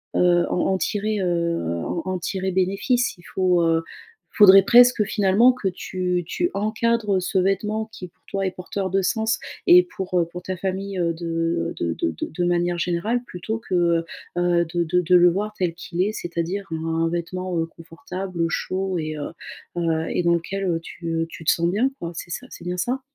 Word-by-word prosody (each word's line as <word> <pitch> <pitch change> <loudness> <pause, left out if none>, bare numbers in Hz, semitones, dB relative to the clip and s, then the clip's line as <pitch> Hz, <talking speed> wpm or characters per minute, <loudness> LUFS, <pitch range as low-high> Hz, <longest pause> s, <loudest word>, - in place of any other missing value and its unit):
heu, 175 -1 +4
en - - 0
en - - +1
tirer, 210 +2 -1
heu, 170 - -1
en 170 - -2
en 185 -1 -2
tirer 190 +2 -2
bénéfice. 195 +6 +1
Il 175 - -18
faut 180 -2 +1
heu, 165 0 +2 0.5
il - - -14
faudrait 195 -2 +9
presque 245 +1 +6
finalement 210 +3 +4
que 230 -6 -3
tu 180 -1 -2
tu 350 - -1
encadres 215 -1 +1
ce 185 +1 -1
vêtement 210 +4 0
qui 185 -4 -8
pour 175 - -30
toi 195 0 -2
est 190 - 0
porteur 190 +1 -4
de 195 +1 +1
sens 220 +4 0 0.3
et 360 +1 +8
pour, 190 - -4
heu, - - +1
pour 175 +2 -9
ta 185 +1 -4
famille, 195 +1 -3
heu, 170 -1 +1
de 165 0 -2
de 85 - -1
de 80 - -1
de 80 - -5
de 175 +2 -3
manière 175 0 +1
générale 180 +8 0
plutôt 220 +3 -4
que, 205 -5 -3
heu, 170 -1 +2 0.3
heu, 175 -1 +2
de 170 -1 +1
de 180 +2 +2
de 180 +1 +3
le 175 0 +6
voir 210 +4 -2
tel 175 -3 0
qu'il 175 +1 -4
est, 205 +3 +1
c'est-à-dire 175 +2 -3
un 165 +1 -1
vêtement, 175 +1 -3
heu, 165 - +1
confortable, 170 +3 -8
heu, 165 - +3
chaud, 190 +3 -2
et 155 -1 -3
heu, 145 - -5 0.5
heu, 165 -1 0
et 180 - 0
dans 170 0 +4
lequel, 195 +4 -3
heu, 170 -3 0
tu, 170 0 -9
heu, 165 0 0
tu 165 - -10
te - - +4
sens 170 0 +1
bien 230 +9 +1
quoi, 170 0 -5
c'est 175 - -7
ça? 255 +7 -5
C'est - - -11
bien 180 +1 -3
ça? 250 +8 -1
180 Hz, 210 wpm, -23 LUFS, 170-195 Hz, 0.5 s, faudrait